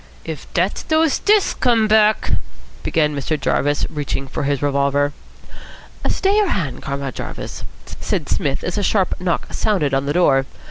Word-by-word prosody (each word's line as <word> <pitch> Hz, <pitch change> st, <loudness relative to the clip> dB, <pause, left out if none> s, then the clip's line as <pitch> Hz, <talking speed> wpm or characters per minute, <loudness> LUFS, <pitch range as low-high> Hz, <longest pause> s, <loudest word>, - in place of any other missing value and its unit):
"If 160 Hz, -3 st, -7 dB
dat's 180 Hz, +3 st, +1 dB
dose 315 Hz, -1 st, +2 dB
stiffs 415 Hz, -1 st, +3 dB
come 230 Hz, -4 st, +2 dB
back 215 Hz, 0 st, +3 dB, 0.3 s
" -, -, -22 dB
began 150 Hz, -3 st, +1 dB
Mr. 145 Hz, +2 st, -2 dB
Jarvis, 145 Hz, +1 st, +1 dB
reaching 145 Hz, -2 st, -4 dB
for -, -, -4 dB
his 140 Hz, -1 st, 0 dB
revolver. 140 Hz, 0 st, +1 dB, 1.0 s
"Stay 390 Hz, +1 st, +2 dB
your 415 Hz, -3 st, +3 dB
hand, 155 Hz, -, -2 dB
Comrade 140 Hz, -2 st, -4 dB
Jarvis," -, -, -6 dB, 0.2 s
said -, -, -3 dB, 0.4 s
as 180 Hz, +3 st, -2 dB
a -, -, 0 dB
sharp 195 Hz, -2 st, +2 dB
knock 180 Hz, -2 st, -2 dB
sounded 180 Hz, -11 st, +1 dB
on 135 Hz, +1 st, +1 dB
the 145 Hz, -, 0 dB
door. 135 Hz, -7 st, +3 dB
155 Hz, 155 wpm, -20 LUFS, 140-215 Hz, 1.0 s, stiffs